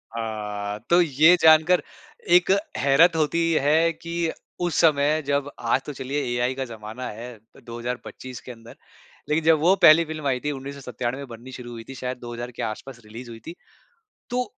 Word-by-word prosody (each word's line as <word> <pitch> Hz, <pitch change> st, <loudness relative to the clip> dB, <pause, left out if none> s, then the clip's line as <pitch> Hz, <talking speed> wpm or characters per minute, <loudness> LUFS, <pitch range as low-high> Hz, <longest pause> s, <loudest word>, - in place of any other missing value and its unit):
हाँ, 105 Hz, -2 st, -4 dB
तो 175 Hz, +1 st, +6 dB
ये 160 Hz, +2 st, +5 dB
जानकार 160 Hz, +3 st, +6 dB, 0.5 s
एक 180 Hz, -, +4 dB, 0.3 s
हैरत 145 Hz, +6 st, +4 dB
होती 165 Hz, +2 st, +1 dB
है 160 Hz, +4 st, +3 dB
कि 170 Hz, 0 st, -3 dB, 0.3 s
उस 175 Hz, -3 st, -1 dB
समय 155 Hz, -1 st, +3 dB
जब 140 Hz, 0 st, 0 dB
आज 120 Hz, +3 st, +1 dB
तो 150 Hz, -, -6 dB
चलिए 135 Hz, +2 st, -3 dB
एआई 125 Hz, +1 st, 0 dB
का 135 Hz, 0 st, -3 dB
जमाना 115 Hz, +1 st, -8 dB
है 115 Hz, +2 st, -9 dB
तो 110 Hz, +2 st, -22 dB
2025 120 Hz, +1 st, -7 dB
के -, -, -9 dB
अंदर 115 Hz, -1 st, -13 dB, 0.5 s
लेकिन 155 Hz, +2 st, +1 dB
जब 160 Hz, -1 st, +4 dB
वो 175 Hz, +5 st, +4 dB
पहली 165 Hz, 0 st, +8 dB
फ़िल्म 155 Hz, -2 st, -5 dB
आई 130 Hz, -2 st, +1 dB
थी 150 Hz, -, 0 dB
1997 135 Hz, -1 st, -5 dB
बननी 120 Hz, +1 st, -11 dB
शुरू 125 Hz, -1 st, -9 dB
हुई 115 Hz, -1 st, -8 dB
थी 135 Hz, -, -7 dB
शायद 125 Hz, 0 st, -4 dB
2000 120 Hz, 0 st, -7 dB
के 120 Hz, -, -8 dB
आस-पास 120 Hz, +3 st, -6 dB
रिलीज़ 115 Hz, +3 st, -10 dB
हुई 115 Hz, -1 st, -10 dB
थी। 165 Hz, -, -6 dB, 0.8 s
तो 250 Hz, +1 st, 0 dB
135 Hz, 175 wpm, -24 LUFS, 120-155 Hz, 0.8 s, पहली